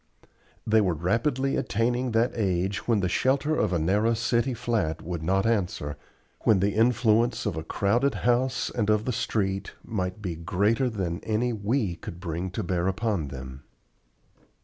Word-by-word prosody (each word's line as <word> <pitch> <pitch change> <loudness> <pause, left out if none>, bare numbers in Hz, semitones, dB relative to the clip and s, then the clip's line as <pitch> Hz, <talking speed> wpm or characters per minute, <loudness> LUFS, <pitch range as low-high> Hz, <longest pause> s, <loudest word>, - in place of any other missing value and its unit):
They 110 0 +4
were 90 -5 +1
rapidly 120 - 0
attaining 120 +3 0
that 115 +2 +3
age 95 -3 -1
when 115 -4 +3
the 90 - +1
shelter 135 - +1
of 105 -8 +1
a 90 - +2
narrow 105 +8 +2
city 120 +2 0
flat 115 -9 -1
would 85 -1 -4
not 95 +4 +1
answer, 90 -10 -1 0.4
when 105 -4 +3
the 100 +2 +1
influence 115 +1 +2
of 105 -6 -1
a 80 - -4
crowded 115 - +1
house 125 +2 +1
and 105 -3 -1
of 105 0 +2
the 125 - -1
street 100 -4 -1
might 95 -2 -3
be 95 -5 -3
greater 100 +9 +1
than 95 -6 -3
any 115 +3 -1
we 105 -3 -1
could 85 - -8
bring 90 +1 -3
to 90 - -4
bear 90 0 0
upon 95 -5 -1
them. 65 0 -8
105 Hz, 165 wpm, -26 LUFS, 90-115 Hz, 0.4 s, They